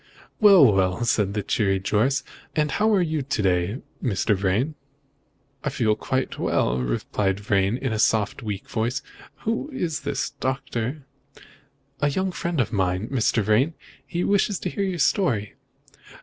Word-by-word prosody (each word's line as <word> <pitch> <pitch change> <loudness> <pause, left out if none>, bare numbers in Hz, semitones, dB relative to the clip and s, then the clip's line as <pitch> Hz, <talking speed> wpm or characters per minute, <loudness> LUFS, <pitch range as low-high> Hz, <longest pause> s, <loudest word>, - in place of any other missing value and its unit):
"Well, 190 - +7
well!" 95 +4 +1
said 105 -3 +1
the 105 - -1
cheery 95 -2 +1
Jorce, 105 +8 +1 0.3
"and 150 -2 +1
how 215 +9 +2
are 185 - +3
you 155 -3 -1
to 130 -4 -2
day, 90 +5 +1 0.2
Mr. 105 -3 +1
Vrain?" 100 +10 0 0.9
"I - - 0
feel 110 -4 +1
very 130 +4 -1
well," 65 +1 +1
replied 95 +11 -1
Vrain 100 +1 +1
in 130 -3 -2
a 110 - -2
soft, 110 +1 +2
weak 105 -4 -5
voice. 120 +5 -2 0.4
"Who 230 +6 -2
is 170 - -2
this, 135 -1 -2
Doctor?" 130 +1 -3 0.9
"A 145 - +2
young 190 +6 -1
friend 170 -2 -3
of 120 -1 0
mine, 95 +1 0
Mr. 115 -4 +1
Vrain. 120 +10 +2 0.3
He 175 0 -3
wishes 200 0 +2
to - - -2
hear - - -3
your 190 -2 -1
story." 140 - +1
120 Hz, 155 wpm, -24 LUFS, 100-155 Hz, 0.9 s, Well